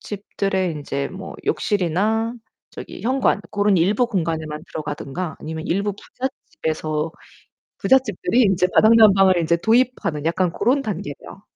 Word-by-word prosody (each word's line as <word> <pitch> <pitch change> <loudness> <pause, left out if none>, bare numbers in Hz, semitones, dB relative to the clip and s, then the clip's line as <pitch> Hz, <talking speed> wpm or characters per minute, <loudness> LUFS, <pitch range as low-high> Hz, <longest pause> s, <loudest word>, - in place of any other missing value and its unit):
집들의 195 -3 -2
인제 140 -2 -4
뭐 190 +1 -9
욕실이나 210 +5 0 0.4
저기 - - -9
현관 255 -4 +1
고런 205 -1 +2
일부 205 +8 +2
공간에만 160 -7 -3
들어가든가 155 +2 -5
아니면 160 +1 -6
일부 200 +3 0
부잣집에서 160 - -4 0.7
부잣집들이 255 -1 +2
인제 190 -4 +3
바닥 220 +1 +6
난방을 195 -5 +6
이제 165 +1 +2
도입하는 225 - +1
약간 175 +1 +1
고런 270 +8 +1
단계죠. 195 - -6
190 Hz, 320 characters per minute, -21 LUFS, 160-215 Hz, 0.7 s, 바닥